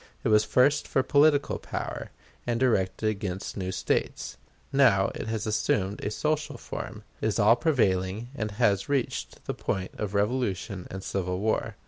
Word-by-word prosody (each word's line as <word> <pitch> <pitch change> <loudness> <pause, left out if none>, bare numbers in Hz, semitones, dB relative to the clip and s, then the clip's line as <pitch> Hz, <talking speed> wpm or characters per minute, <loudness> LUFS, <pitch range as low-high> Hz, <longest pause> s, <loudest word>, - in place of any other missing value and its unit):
It - - +1
was 105 0 +5
first 130 +6 +3
for 130 - +2
political 145 0 +3
power, - - -5 0.4
and 120 -1 0
directed 110 -5 +1
against 100 -2 -3
new 95 -2 -3
States; 95 - -1 0.4
now 115 -9 +5
it - - -5
has 110 -1 -2
assumed 105 -2 0
a - - 0
social 150 +7 -1
form, - - -7 0.2
is 110 -1 0
all 110 +1 +6
prevailing, 110 - +1
and 110 -6 -3
has 100 -1 +1
reached 140 -4 -2
the - - -2
point 95 -1 -3
of 105 -1 -3
revolution 100 -3 -1
and 95 0 -6
civil 90 -2 -2
war. 110 +3 -1
110 Hz, 155 wpm, -27 LUFS, 95-125 Hz, 0.4 s, all